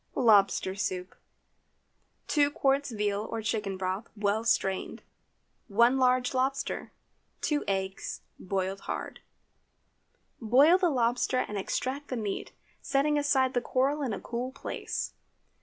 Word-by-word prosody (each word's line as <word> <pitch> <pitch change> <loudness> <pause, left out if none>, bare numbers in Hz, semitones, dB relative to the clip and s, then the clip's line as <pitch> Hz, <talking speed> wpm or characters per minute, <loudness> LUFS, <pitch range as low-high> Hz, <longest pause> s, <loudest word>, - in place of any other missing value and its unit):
LOBSTER 200 -5 +4
SOUP. 185 -2 -3 1.1
2 290 -2 +3
qts. 275 -4 0
veal 205 0 0
or 225 -1 -4
chicken 210 -3 -2
broth, 190 +4 -3
well 205 +2 +1
strained. 195 -5 0 0.6
1 235 +5 +4
large 255 0 +3
lobster. 265 +2 -1 0.5
2 295 -1 0
eggs—boiled 190 0 -3
hard. - - -4 1.2
Boil 275 - +6
the 360 -2 +3
lobster 245 -1 +1
and 210 - -6
extract 270 +8 -3
the 255 - -3
meat, 210 -3 -3 0.3
setting 290 +2 +2
aside 270 -3 +2
the 245 - +1
coral 275 +4 +1
in 265 -5 -1
a 200 - -3
cool 245 +2 -4
place. 275 - -4
240 Hz, 120 wpm, -29 LUFS, 200-270 Hz, 1.2 s, Boil